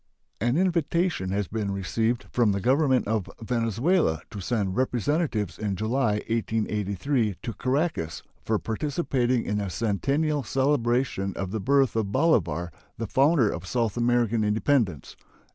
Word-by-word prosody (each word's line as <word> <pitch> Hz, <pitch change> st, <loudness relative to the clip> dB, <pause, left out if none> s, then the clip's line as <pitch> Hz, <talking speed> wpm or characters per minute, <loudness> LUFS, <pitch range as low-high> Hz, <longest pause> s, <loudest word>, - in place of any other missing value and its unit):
An 120 Hz, +6 st, +1 dB
invitation 170 Hz, -, +1 dB
has 100 Hz, 0 st, -1 dB
been 105 Hz, 0 st, -3 dB
received 110 Hz, +4 st, -1 dB
from 115 Hz, -4 st, +3 dB
the 100 Hz, -, -1 dB
Government 130 Hz, +2 st, +2 dB
of 110 Hz, -3 st, -1 dB
Venezuela 115 Hz, -, +1 dB
to 105 Hz, -, -6 dB
send 100 Hz, -1 st, -1 dB
representatives 125 Hz, -, 0 dB
in 105 Hz, -2 st, -1 dB
July, 110 Hz, +3 st, +1 dB
1883, 110 Hz, 0 st, -1 dB
to 115 Hz, -, -4 dB
Caracas 130 Hz, -, -1 dB, 0.2 s
for 110 Hz, -, +1 dB
participating 125 Hz, 0 st, -1 dB
in 105 Hz, 0 st, -1 dB
the 100 Hz, -2 st, -3 dB
centennial 140 Hz, -, 0 dB
celebration 130 Hz, -7 st, 0 dB
of 95 Hz, -1 st, -4 dB
the 110 Hz, -, -2 dB
birth 135 Hz, +3 st, +2 dB
of 110 Hz, -3 st, -1 dB
Bolivar, 90 Hz, -, +1 dB, 0.3 s
the 115 Hz, -, -3 dB
founder 135 Hz, -, +3 dB
of 90 Hz, +2 st, -6 dB
South 115 Hz, -1 st, 0 dB
American 120 Hz, -2 st, +2 dB
independence. 105 Hz, -, 0 dB
115 Hz, 135 wpm, -26 LUFS, 100-135 Hz, 0.3 s, from